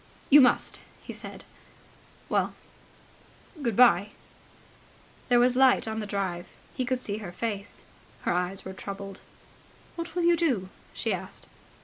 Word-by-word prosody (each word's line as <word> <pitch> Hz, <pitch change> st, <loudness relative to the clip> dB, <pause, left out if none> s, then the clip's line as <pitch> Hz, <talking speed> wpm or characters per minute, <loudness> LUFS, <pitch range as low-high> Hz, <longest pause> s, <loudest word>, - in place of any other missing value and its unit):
"You 290 Hz, +1 st, +10 dB
must," 250 Hz, -, +3 dB, 0.2 s
he -, -, -7 dB
said. -, -, -8 dB, 0.8 s
"Well... -, -, 0 dB, 1.1 s
good 235 Hz, -6 st, 0 dB
bye." 205 Hz, -4 st, +5 dB, 1.2 s
There 245 Hz, -1 st, +6 dB
was 245 Hz, +1 st, +4 dB
light 260 Hz, -3 st, +5 dB
on 220 Hz, 0 st, -3 dB
the 210 Hz, -, -4 dB
drive. 190 Hz, -4 st, -3 dB, 0.3 s
He 255 Hz, -, -2 dB
could 255 Hz, 0 st, -1 dB
see 205 Hz, 0 st, -2 dB
her 200 Hz, -5 st, -7 dB
face. 205 Hz, +1 st, -4 dB, 0.4 s
Her -, -, +1 dB
eyes 180 Hz, +2 st, -2 dB
were 190 Hz, -, -6 dB
troubled. 195 Hz, 0 st, -7 dB, 0.8 s
"What 335 Hz, 0 st, -6 dB
will 350 Hz, -, 0 dB
you 345 Hz, 0 st, +5 dB
do?" 255 Hz, -, 0 dB, 0.3 s
she -, -, 0 dB
asked. -, -, -6 dB
220 Hz, 140 wpm, -28 LUFS, 195-255 Hz, 1.2 s, You